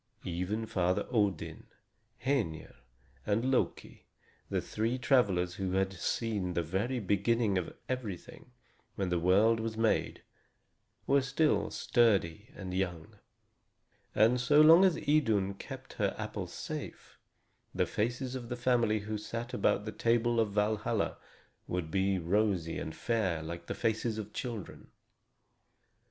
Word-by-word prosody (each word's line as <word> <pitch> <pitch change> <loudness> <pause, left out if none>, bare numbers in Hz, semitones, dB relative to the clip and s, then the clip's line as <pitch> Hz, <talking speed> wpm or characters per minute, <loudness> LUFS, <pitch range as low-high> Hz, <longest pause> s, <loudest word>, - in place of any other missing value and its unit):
Even 90 +6 -2
Father 90 -5 0
Odin, 105 -8 -1 0.6
Hœnir, 110 - -1 0.5
and 115 +5 0
Loki, 130 - -2 0.4
the - - 0
three 115 +4 -2
travelers 100 -10 +2
who 95 -1 -1
had 95 0 +1
seen 95 -1 -2
the 85 - +1
very 100 +10 -1
beginning 105 +1 +1
of 90 -3 -2
everything, 125 -2 -6 0.5
when 95 -2 -1
the 90 -1 +1
world 100 +6 +4
was 110 0 -3
made, 115 -1 0 0.8
were 140 0 +4
still 135 +4 +1
sturdy 105 -4 +1
and 95 -2 -6
young. 90 -4 -3 1.0
And 115 +4 +4
so 145 +4 +4
long 165 +4 +8
as 180 -4 +3
Idun 115 -12 +2
kept 100 - -9
her - - +1
apples - - -5
safe, - - -7 0.5
the - - +1
faces 120 +4 -2
of 125 -3 -6
the 125 - -3
family 120 -4 +2
who 105 +1 -4
sat 115 +4 -5
about 105 -2 +1
the 110 - -4
table 115 +2 +1
of 110 -2 +1
Valhalla 105 +1 0 0.5
would 90 -3 -3
be 95 +1 +1
rosy 90 -1 0
and 80 - -5
fair 95 -4 -1
like 85 +1 -7
the - - -3
faces 115 -1 -1
of 105 -1 -6
children. 115 -7 -6
105 Hz, 135 wpm, -31 LUFS, 95-120 Hz, 1.0 s, long